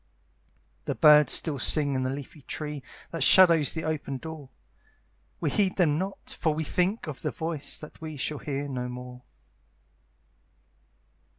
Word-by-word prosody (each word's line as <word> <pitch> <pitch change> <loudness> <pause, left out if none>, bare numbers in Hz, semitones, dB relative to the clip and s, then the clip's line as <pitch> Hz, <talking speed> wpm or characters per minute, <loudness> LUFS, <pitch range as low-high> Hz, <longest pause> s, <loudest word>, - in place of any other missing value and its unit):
The - - -2
birds 150 -1 +6
still 150 -5 +2
sing 145 +4 +5
in 130 - -1
the 130 - -1
leafy 140 +2 -7
tree 150 +1 -5 0.3
That 165 - -5
shadows 170 -3 +6
the 160 - -4
open 150 -3 -3
door; 155 -2 -9 0.9
We - - -1
heed 195 -3 +1
them 155 -5 +2
not, 195 +2 -6
for 155 -2 +1
we 160 - -2
think 180 +7 -1
of 155 -4 -7
the - - -1
voice 160 -4 -4
That 150 - -13
we 155 -2 -7
shall 145 +2 -3
hear 145 0 -4
no 125 -2 -4
more. 125 0 -9
150 Hz, 155 wpm, -27 LUFS, 140-160 Hz, 0.9 s, birds